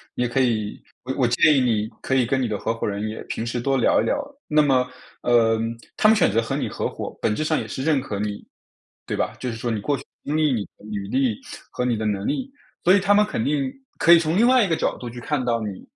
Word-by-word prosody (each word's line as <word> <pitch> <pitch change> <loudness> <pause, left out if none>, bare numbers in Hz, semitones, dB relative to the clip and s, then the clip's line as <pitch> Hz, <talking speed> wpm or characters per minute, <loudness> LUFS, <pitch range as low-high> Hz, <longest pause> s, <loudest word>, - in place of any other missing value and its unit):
你 125 - 0
也 120 - 0
可 135 - 0
以 110 -5 0 0.2
我 130 +1 -3
我 125 -3 +3
建 150 +6 +4
议 - - +5
你， 110 -4 +1
可 130 - -1
以 125 -2 +3
跟 130 +2 0
你 125 - 0
的 105 -2 -2
合 115 - -1
伙 115 - -3
人 105 +1 -2
也 110 - -6
平 115 - -4
时 120 +1 -2
多 135 +2 0
聊 125 - +3
一 - - -1
聊。 - - +1 0.3
那 150 0 +4
么， 130 -3 +2 0.3
呃， 115 -2 +3 0.4
他 215 - +4
们 220 - +6
选 205 - +3
择 115 +2 +2
和 115 - -3
你 - - -2
合 - - -2
伙， - - -6
本 105 - +1
质 155 - -1
上 155 0 +1
也 - - -5
是 130 - -5
认 155 -3 +3
可 105 -6 -5
你。 105 -1 -3 0.6
对 - - -3
吧？ - - -1
就 125 - -3
是 115 - -4
说 120 +1 -2
你 105 -2 -2
过 140 +5 0
去 - - -10
的 - - -44 0.2
经 150 +2 -1
历、 150 -4 +3
你 105 -4 -1
的 - - -17
履 100 -2 -5
历， 130 -2 0 0.3
和 125 - -2
你 120 -3 +1
的 110 - -3
能 100 -1 -1
力。 265 - -2 0.3
所 185 - +6
以 200 - +6
他 195 +2 +1
们 210 +1 +5
肯 115 - -2
定， 140 -2 0 0.3
可 170 - +6
以 170 - +8
从 165 +2 0
另 235 - +5
外 255 -2 +5
一 190 - 0
个 165 - +2
角 - - -1
度 120 - -6
去 120 +1 -9
看 135 +1 -2
到 120 -1 +1
你， 105 -3 -5
125 Hz, 310 characters per minute, -23 LUFS, 110-150 Hz, 0.6 s, 以